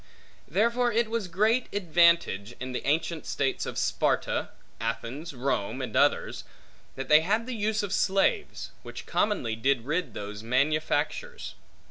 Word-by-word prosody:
Therefore 235 Hz, -, +2 dB
it 230 Hz, 0 st, +1 dB
was 230 Hz, -4 st, -1 dB
great 215 Hz, +8 st, +1 dB
advantage, 170 Hz, -, +2 dB
in 130 Hz, 0 st, -5 dB
the 125 Hz, -, -4 dB
ancient 160 Hz, +2 st, 0 dB
states 135 Hz, -2 st, -1 dB
of -, -, -5 dB
Sparta, -, -, 0 dB, 0.3 s
Athens, 115 Hz, +7 st, -4 dB
Rome, 125 Hz, -5 st, -1 dB
and -, -, -5 dB
others, -, -, +2 dB, 0.5 s
that 135 Hz, 0 st, -5 dB
they 150 Hz, 0 st, +7 dB
had 215 Hz, +7 st, 0 dB
the 255 Hz, -, -4 dB
use 215 Hz, -1 st, 0 dB
of 195 Hz, -2 st, -3 dB
slaves, 195 Hz, -, +1 dB
which -, -, -9 dB
commonly 155 Hz, -, 0 dB
did 125 Hz, +1 st, +1 dB
rid 150 Hz, -3 st, -2 dB
those 105 Hz, 0 st, -6 dB
manufactures. 155 Hz, -, -1 dB
165 Hz, 140 wpm, -28 LUFS, 130-210 Hz, 0.5 s, they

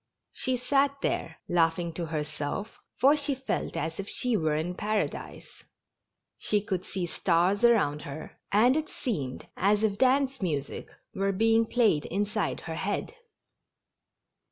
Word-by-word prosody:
She 255 Hz, -1 st, 0 dB
sat 275 Hz, +3 st, +1 dB
there, -, -, -1 dB
laughing 170 Hz, 0 st, +1 dB
to 170 Hz, 0 st, -4 dB
herself, 155 Hz, +6 st, -4 dB, 0.2 s
for 275 Hz, +4 st, +6 dB
she 285 Hz, -2 st, -1 dB
felt 265 Hz, +1 st, -3 dB
as 160 Hz, +3 st, -3 dB
if 195 Hz, -, -4 dB
she 250 Hz, -2 st, 0 dB
were 155 Hz, -5 st, +1 dB
in 160 Hz, +4 st, -1 dB
paradise; 210 Hz, +2 st, -3 dB, 0.8 s
she 210 Hz, -, +1 dB
could 190 Hz, -3 st, -3 dB
see 185 Hz, -2 st, -3 dB
stars 175 Hz, +3 st, +2 dB
aroimd 205 Hz, -12 st, +4 dB
her, 150 Hz, 0 st, -8 dB
and 235 Hz, +6 st, +5 dB
it 310 Hz, 0 st, -1 dB
seemed 145 Hz, -, -4 dB
as 205 Hz, +3 st, +2 dB
if 205 Hz, -2 st, +1 dB
dance 265 Hz, 0 st, +3 dB
music 145 Hz, -7 st, -3 dB, 0.2 s
were 195 Hz, +1 st, 0 dB
being 225 Hz, +3 st, +3 dB
played 215 Hz, -, +2 dB
inside 205 Hz, +3 st, -1 dB
her 165 Hz, -, -5 dB
head. 195 Hz, +5 st, -2 dB
200 Hz, 140 wpm, -28 LUFS, 165-235 Hz, 0.8 s, for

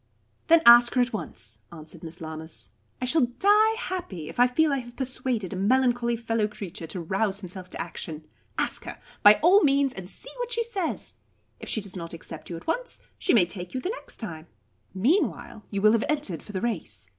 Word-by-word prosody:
"Then 330 Hz, 0 st, +6 dB
ask 240 Hz, +1 st, +8 dB
her 250 Hz, -, +5 dB
at 245 Hz, -1 st, 0 dB
once," 110 Hz, -, -6 dB
answered 160 Hz, 0 st, -11 dB
Miss 165 Hz, 0 st, -8 dB
Lammas. 160 Hz, -3 st, -7 dB, 0.3 s
"I 255 Hz, -, -2 dB
shall 255 Hz, 0 st, +3 dB
die 425 Hz, +3 st, +5 dB
happy 345 Hz, -, -5 dB
if -, -, -9 dB
I 245 Hz, -, +7 dB
feel 300 Hz, +4 st, +2 dB
I 275 Hz, -, +1 dB
have 240 Hz, -1 st, -10 dB
persuaded 255 Hz, -6 st, -2 dB
a -, -, -4 dB
melancholy 240 Hz, +3 st, +2 dB
fellow 225 Hz, -2 st, 0 dB
creature 190 Hz, -5 st, -8 dB
to 180 Hz, -, -5 dB
rouse 195 Hz, +4 st, -1 dB
himself 185 Hz, -1 st, -7 dB
to -, -, -8 dB
action. 160 Hz, -2 st, -6 dB, 0.3 s
Ask -, -, +1 dB
her, -, -, -7 dB, 0.2 s
by 205 Hz, +1 st, +9 dB
all 380 Hz, +5 st, +7 dB
means, 275 Hz, -3 st, +3 dB
and 185 Hz, -1 st, -8 dB
see -, -, -8 dB
what -, -, -4 dB
she 470 Hz, 0 st, 0 dB
says. 400 Hz, -8 st, -4 dB, 0.4 s
If -, -, -8 dB
she 220 Hz, -, 0 dB
does 195 Hz, -2 st, -7 dB
not 170 Hz, -2 st, -6 dB
accept 165 Hz, -1 st, -9 dB
you 170 Hz, -, -4 dB
at -, -, -12 dB
once, -, -, -2 dB, 0.2 s
she 365 Hz, -, +3 dB
may 195 Hz, -6 st, +6 dB
take 180 Hz, +3 st, -8 dB
you -, -, 0 dB
the 360 Hz, -, -3 dB
next 480 Hz, -, -7 dB
time. 165 Hz, -7 st, -7 dB, 0.4 s
Meanwhile, 230 Hz, -, 0 dB
you 200 Hz, -1 st, -3 dB
will 215 Hz, -, +7 dB
have 225 Hz, 0 st, +2 dB
entered 285 Hz, -, -1 dB
for -, -, -11 dB
the 190 Hz, -2 st, -3 dB
race. 160 Hz, -, -4 dB
220 Hz, 210 wpm, -26 LUFS, 180-275 Hz, 0.4 s, by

